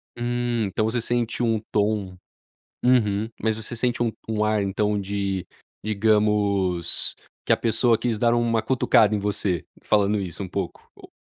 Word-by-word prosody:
Hum, 120 -1 -1
então 100 +2 -1
você 115 +2 0
sente 120 0 -1
um 115 -2 +2
tom 100 -3 0 0.7
uhum, 110 -4 +2
mas 110 -1 +1
você 110 +1 -6
sente 120 0 -1
um 115 - 0 0.2
um 110 -1 0
ar, 105 -1 +1
então 105 +1 0
de 100 -1 -2 0.4
digamos 105 -4 +1 0.3
que - - 0
a - - +1
pessoa 115 0 +2
quis 115 -1 -1
dar 115 +2 +3
uma 120 -1 +1
cutucada 110 -3 +3
em - - -1
você 100 -4 -1 0.2
falando 105 0 +2
isso, 95 -1 -5
um 95 - -7
pouco 95 -1 -5
ou - - -15
105 Hz, 160 wpm, -24 LUFS, 100-115 Hz, 0.7 s, dar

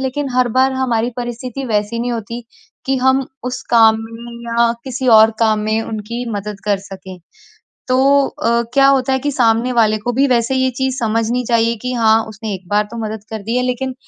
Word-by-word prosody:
लेकिन 270 +2 -2
हर 250 -1 +3
बार 265 +1 +4
हमारी 245 -3 0
परिस्थिति 245 +2 -5
वैसी 210 0 -1
नहीं 245 +1 -2
होती 235 +1 -5 0.4
कि 270 0 +1
हम 265 +1 +2 0.2
उस 250 0 -4
काम 225 -2 +6
में 230 +1 -10 0.2
या 235 0 +3
किसी 260 0 -4
और 220 -1 +7
काम 220 -2 +2
में 220 +1 +1
उनकी 225 +2 -5
मदद 205 -1 -5
कर 205 -1 +1
सकें। 190 -1 -9 0.7
तो 255 - +2 0.3
अ, 235 0 0
क्या 275 -1 +5
होता 270 -1 +3
है 265 - +2
कि 290 +2 -2
सामने 235 -1 +2
वाले 220 -3 +3
को 240 +4 -3
भी 270 +4 +2
वैसे 240 0 +1
ये 260 0 +1
चीज़ 265 -1 -1
समझनी 230 +2 0
चाहिए 230 0 +2
कि 250 0 -3
हाँ, 225 -2 +3
उसने 220 0 -6
एक 185 -1 -10
बार 210 +2 +2
तो 235 - -8
मदद 215 -1 -6
कर 220 -2 -5
दी 225 +4 -2
है, 250 - +1
लेकिन 255 +1 -2
235 Hz, 205 wpm, -17 LUFS, 220-255 Hz, 0.7 s, और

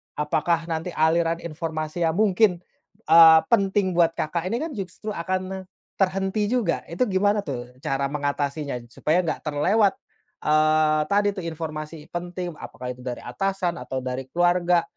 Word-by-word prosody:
apakah 155 +3 0
nanti 165 +2 -3
aliran 165 +2 +2
informasi 155 0 -4
yang 160 - 0
mungkin, 195 -3 +3 0.5
eee, 160 -1 +9
penting 195 -3 +2
buat 170 -1 +2
Kakak 170 +3 -2
ini 230 - -1
kan 325 - -4
justru 205 -1 -6
akan 185 +1 -2
ne 190 - -4 0.4
terhenti 195 +3 0
juga? 230 -9 0
Itu 230 +8 0
gimana 205 +2 +2
tuh 125 -9 -5
cara 135 +1 -2
mengatasinya 145 -2 -2
supaya 170 +7 +1
enggak 155 - -2
terlewat, 190 +8 +2 0.5
eee, 155 0 +3
tadi 205 0 +2
tuh 195 - -7
informasi 155 -1 -6
penting, 175 0 -4
apakah 125 0 -7
itu 125 - -10
dari 125 -1 -6
atasan 180 +5 -2
atau 130 -1 -5
dari 130 +1 -4
keluarga, 175 +2 +2
170 Hz, 150 wpm, -24 LUFS, 155-190 Hz, 0.5 s, eee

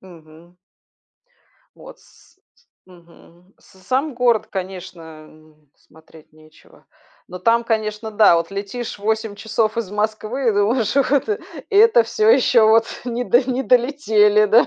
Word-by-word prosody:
Мгм. 170 -1 -18 1.2
Вот - - -15
с - - -25
ть 385 - -37 0.2
мгм. 175 0 -21
С 190 - -23
сам 265 +7 -2
город, 240 -3 +1
конечно, 185 -2 -8 0.2
м, 155 -2 -22
смотреть 160 0 -21
нечего. 155 0 -22 0.4
Но 180 - -9
там, 235 +3 +1
конечно, 220 -1 -3
да, 210 -5 +4
вот 170 - -3
летишь 205 +3 -6
8 220 0 -2
часов 220 +1 -2
из 210 -5 -4
Москвы, 215 +4 -3
и - - +2
думаешь: 210 +2 0
"Ух 275 - +2 0.2
ты, 425 0 -3 0.3
это 450 +4 +5
всё 435 0 0
еще 255 - +4
вот 225 +1 +4 0.2
не 245 0 -4
до 245 +2 +3
не 255 +2 -2
долетели, 230 -5 +2
да". 225 +4 +4
215 Hz, 145 wpm, -19 LUFS, 185-240 Hz, 1.2 s, это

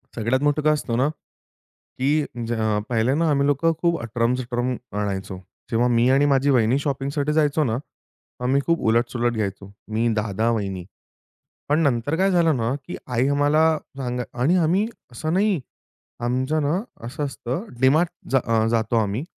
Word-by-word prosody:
सगळ्यात 120 +4 0
मोठं 145 +1 +2
काय 155 +1 +4
असतो 140 -6 -2
ना, 130 +4 +2
की 150 -1 -5 0.3
ज 120 - -1 0.4
पहिले 120 +2 +2
ना 165 +1 +2
आम्ही 140 -1 +2
लोकं 145 +4 +2
खूप 170 -1 +2
अटरम-सटरम 120 +2 -1 0.2
आणायचो. 95 -2 -3 0.3
जेव्हा 120 +2 +2
मी 120 +2 +4
आणि 135 +2 +4
माझी 140 0 +3
वहिनी 125 -1 +3
शॉपिंगसाठी 140 +1 -1
जायचो 150 0 +2
ना. 115 -4 0 0.7
आम्ही 135 +3 +2
खूप 170 0 +2
उलट-सुलट 120 +1 +1
घ्यायचो. 100 -3 -4 0.2
मी, 110 +2 0
दादा, 110 +1 0
वहिनी. 95 -5 -3 0.8
पण 150 +2 +3
नंतर 140 +1 +1
काय 195 +2 +3
झालं 170 -4 +3
ना, 115 +1 0
की - - -5
आई 125 +1 +1
आम्हाला 145 +3 +3 0.3
सांगा 125 -2 -2 0.2
आणि 155 +8 +3
आम्ही 180 +6 +2 0.2
असं 155 +7 -3
नाही. 195 -1 +2 0.7
आमचं 130 +5 0
ना 150 +5 +1 0.3
असं 135 +5 -4
असतं, 135 - -4 0.2
डीमार्ट 155 +6 +4 0.2
जा 135 - +4
अ, 115 -1 +2
जातो 115 0 +1
आम्ही. 110 +4 0
130 Hz, 160 wpm, -23 LUFS, 115-150 Hz, 0.8 s, काय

